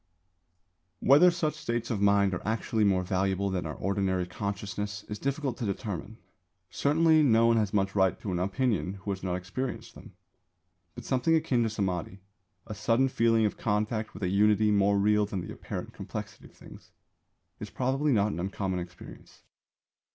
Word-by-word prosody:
Whether 150 Hz, +6 st, +6 dB
such 170 Hz, -3 st, -1 dB
states 120 Hz, -6 st, -3 dB
of 105 Hz, -4 st, -1 dB
mind 100 Hz, -1 st, +3 dB
are 90 Hz, -, -3 dB
actually 110 Hz, 0 st, -1 dB
more 95 Hz, -2 st, +2 dB
valuable 95 Hz, +1 st, 0 dB
than 90 Hz, -4 st, -2 dB
our 75 Hz, -, -5 dB
ordinary 95 Hz, -2 st, -1 dB
consciousness 100 Hz, +1 st, -4 dB
is 105 Hz, 0 st, -6 dB
difficult 140 Hz, -1 st, -2 dB
to 120 Hz, -, -3 dB
determine. 100 Hz, 0 st, -5 dB, 0.5 s
Certainly 160 Hz, +2 st, +3 dB
no 115 Hz, -5 st, +4 dB
one 115 Hz, 0 st, +4 dB
has 105 Hz, -3 st, +1 dB
much 95 Hz, -1 st, 0 dB
right 95 Hz, -2 st, +2 dB
to 100 Hz, -, -5 dB
an 90 Hz, -, -1 dB
opinion 95 Hz, -, 0 dB
who 100 Hz, +1 st, -5 dB
has 95 Hz, -, -4 dB
not 90 Hz, -1 st, -2 dB
experienced 95 Hz, +9 st, -5 dB
them. -, -, -14 dB, 0.8 s
But 120 Hz, -, -9 dB
something 130 Hz, +5 st, +2 dB
akin 145 Hz, -6 st, +1 dB
to 115 Hz, -, +1 dB
Samādhi 95 Hz, -3 st, -3 dB, 0.5 s
a -, -, -6 dB
sudden 115 Hz, +5 st, +1 dB
feeling 115 Hz, -3 st, +2 dB
of 105 Hz, -, -2 dB
contact 110 Hz, +1 st, -1 dB
with -, -, -7 dB
a 90 Hz, -, +1 dB
unity 105 Hz, +2 st, +3 dB
more 100 Hz, 0 st, +3 dB
real 105 Hz, +1 st, +3 dB
than 100 Hz, -3 st, -4 dB
the -, -, -7 dB
apparent -, -, -7 dB
complexity -, -, -7 dB
of -, -, -16 dB
things -, -, -15 dB, 0.7 s
is -, -, -7 dB
probably 135 Hz, +4 st, 0 dB
not 105 Hz, -3 st, +2 dB
an -, -, -5 dB
uncommon 95 Hz, 0 st, -2 dB
experience. 90 Hz, 0 st, -11 dB
105 Hz, 175 wpm, -28 LUFS, 95-120 Hz, 0.8 s, Whether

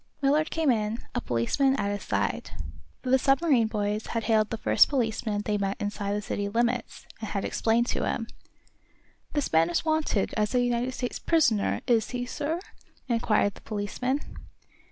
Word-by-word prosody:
Millard 300 Hz, +3 st, +3 dB
came 320 Hz, -4 st, +2 dB
in, 215 Hz, -1 st, 0 dB, 0.2 s
a 245 Hz, -, -1 dB
policeman 235 Hz, -, +1 dB
at 200 Hz, -6 st, -1 dB
his 205 Hz, -, -3 dB
side, -, -, -1 dB, 0.5 s
for 255 Hz, -, -2 dB
the 265 Hz, -, +6 dB
submarine 270 Hz, -4 st, +3 dB
boys 210 Hz, 0 st, -2 dB
had 230 Hz, -1 st, -2 dB
hailed 215 Hz, -2 st, +2 dB
the 225 Hz, -, -3 dB
first -, -, +4 dB
policeman 220 Hz, -5 st, -1 dB
they 210 Hz, -1 st, 0 dB
met 195 Hz, 0 st, -1 dB
inside 205 Hz, -1 st, -2 dB
the 210 Hz, -, -3 dB
city 200 Hz, +1 st, -2 dB
limits, 235 Hz, +2 st, -1 dB
and 220 Hz, -, -5 dB
had 200 Hz, -, -2 dB
explained 230 Hz, +1 st, +2 dB
to -, -, -1 dB
him. 225 Hz, -, -1 dB, 1.1 s
"This 290 Hz, -, -1 dB
man 165 Hz, +1 st, +4 dB
is 175 Hz, -, 0 dB
wanted 315 Hz, -10 st, +1 dB
as 210 Hz, +2 st, 0 dB
a -, -, +5 dB
United 245 Hz, +1 st, 0 dB
States 245 Hz, -, -3 dB
prisoner, 300 Hz, -11 st, +2 dB
is 230 Hz, -3 st, +2 dB
he, 245 Hz, -1 st, -3 dB
sir?" 300 Hz, +6 st, -2 dB, 0.5 s
inquired 220 Hz, -4 st, +2 dB
the -, -, -15 dB
policeman. 230 Hz, +6 st, -2 dB
230 Hz, 175 wpm, -27 LUFS, 210-260 Hz, 1.1 s, the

